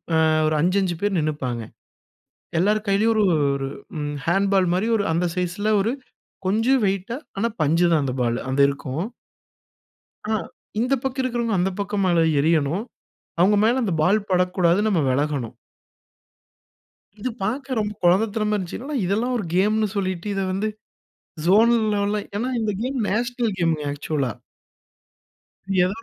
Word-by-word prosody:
அ, - - +4 0.3
ஒரு 155 - +1
5 180 +4 +2
5 180 -3 -1
பேர் 205 -1 0
நின்னுப்பாங்க. 140 -6 -2 1.0
எல்லாரு 210 +5 +2
கையிலயும் 205 +3 +3
ஒரு 215 -1 +3 0.3
ஒரு 135 -1 -3 0.3
ம், 145 0 -3
ஹேண்ட்பால் 195 +2 +3
மாதிரி 190 +4 0
ஒரு 205 - 0
அந்த 170 +2 +1
சைஸ்ல 180 +4 -1
ஒரு 210 +4 +1 0.6
கொஞ்சம் 225 +7 +2
வெயிட்டா, 195 +4 -2 0.2
ஆனா, 215 +4 +1
பஞ்சுதான் 165 +1 +3
அந்த 130 - -1
பாலு. 120 -1 +1
அது 135 +2 0
இருக்கும். 140 +3 -3 1.3
ஆ, - - +3 0.5
இந்தப் 255 +2 +1
பக்கம் 265 0 -2
இருக்கறவங்க 235 -3 -1
அந்தப் 185 +2 -1
பக்கம் 200 0 -1
மேல 175 -2 +3 0.2
எறியணும். 160 +5 +1 0.6
அவங்க 195 +4 +5
மேல 240 +4 +3
அந்த 195 -6 0
பால் 200 +6 +2
படக்கூடாது, 180 -1 +2
நம்ம 195 -6 +2
விலகணும். 140 -3 -1 1.7
இது 255 - -2
பாக்க 255 +4 -2
ரொம்ப 210 0 -2
கொழந்தத்தனமா 210 +4 +2
இருந்துச்சு. 245 - -4
இதெல்லாம் 225 +7 0
ஒரு 210 - -3
கேம்ன்னு 210 +3 +2
சொல்லிட்டு 185 -2 -2
இதை 195 0 -1
வந்து 200 +3 -1 0.8
ஜோனல் 225 +4 +5
லெவல 205 +1 0 0.2
ஏன்னா, 235 +5 -1
இந்த 215 -1 0
கேம் 260 +2 -2
நேஷனல் 240 0 -1
கேமுங்க 165 -4 0
ஆக்சுவலா 145 -4 -2 1.5
எதாவது 195 +5 -1
195 Hz, 140 wpm, -23 LUFS, 170-220 Hz, 1.7 s, அவங்க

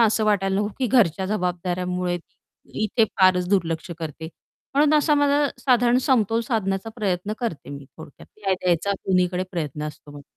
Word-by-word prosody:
असं 220 -1 +3
वाटायला 195 -2 +1
नको 205 +1 0
की 260 - +1
घरच्या 195 -7 +2
जबाबदाऱ्यामुळे 180 -2 -2 0.7
इथे 220 +2 +2 0.2
फारच 180 -1 +4
दुर्लक्ष 170 -3 0
करते 160 0 -6 0.5
म्हणून 295 +1 +4
असा 300 0 +2
माझा 290 0 +3
साधारण 245 -1 +3
समतोल 225 -3 +3
साधण्याचा 215 -2 -2
प्रयत्न 200 -1 -1
करते 230 - -4
मी 140 -1 -8
थोडक्यात 155 -3 -13
न्याय 195 -2 0
द्यायचा 180 +2 +1
कुणीकडे 180 -1 +1
प्रयत्न 150 -4 -4
असतो. 145 -1 -12
190 Hz, 145 wpm, -23 LUFS, 175-225 Hz, 0.7 s, फारच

